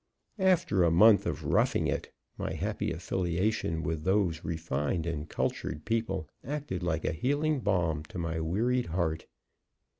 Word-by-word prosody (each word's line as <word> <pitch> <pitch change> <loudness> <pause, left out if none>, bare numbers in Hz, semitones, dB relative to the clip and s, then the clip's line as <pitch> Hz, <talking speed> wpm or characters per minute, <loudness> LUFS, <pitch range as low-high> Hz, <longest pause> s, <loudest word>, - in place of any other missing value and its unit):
After 180 - +3
a 85 - +5
month 100 +6 +6
of - - -3
"roughing - - +2
it," - - -2 0.2
my - - -3
happy - - -2
affiliation 85 0 -1
with 80 -2 -2
those 95 -3 +1
refined 80 0 -2
and 75 -2 -3
cultured 75 - -2
people 115 -8 -1 0.2
acted 140 - -4
like 80 -2 -1
a - - +1
healing 145 - +1
balm 85 -9 +1
to 85 - -9
my 80 -1 -2
wearied 115 +10 0
heart. 80 -2 -1
85 Hz, 145 wpm, -30 LUFS, 80-110 Hz, 0.2 s, month